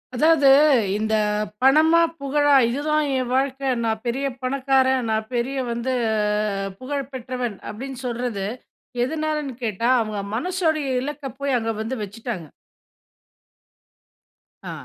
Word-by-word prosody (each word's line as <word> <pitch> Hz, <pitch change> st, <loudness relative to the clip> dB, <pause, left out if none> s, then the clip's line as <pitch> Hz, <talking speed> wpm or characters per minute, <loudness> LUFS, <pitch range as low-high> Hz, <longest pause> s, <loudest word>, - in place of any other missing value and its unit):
அதாவது 305 Hz, +1 st, +4 dB, 0.5 s
இந்த 220 Hz, +1 st, -1 dB, 0.5 s
பணமா, 310 Hz, +5 st, +6 dB, 0.2 s
புகழா 290 Hz, +1 st, +3 dB
"இதுதான் 300 Hz, +4 st, 0 dB
என் 255 Hz, -1 st, -2 dB
வாழ்க்க. 270 Hz, +1 st, 0 dB, 0.2 s
நான் 220 Hz, -1 st, -1 dB
பெரிய 265 Hz, +4 st, -1 dB, 0.2 s
பணக்காரன், 260 Hz, -1 st, +1 dB
நான் 220 Hz, 0 st, -1 dB
பெரிய 250 Hz, +3 st, -1 dB
வந்து 235 Hz, +2 st, -2 dB, 0.9 s
புகழ் 275 Hz, 0 st, -4 dB
பெற்றவன்" 250 Hz, -3 st, -4 dB
அப்டின்னு 260 Hz, +3 st, -7 dB
சொல்றது, 240 Hz, -5 st, -2 dB, 0.6 s
எதுனாலன்னு 305 Hz, -1 st, -2 dB
கேட்டா 230 Hz, +1 st, 0 dB
அவங்க 215 Hz, -2 st, -3 dB
மனசோடைய 320 Hz, 0 st, 0 dB, 0.2 s
இலக்க 295 Hz, 0 st, -6 dB, 0.2 s
போய் 280 Hz, -2 st, +1 dB
அங்க 225 Hz, 0 st, -2 dB
வந்து 225 Hz, +4 st, -3 dB
வச்சுட்டாங்க. 210 Hz, -3 st, -6 dB, 2.2 s
ஆ -, -, -4 dB
260 Hz, 110 wpm, -23 LUFS, 235-285 Hz, 2.2 s, பணமா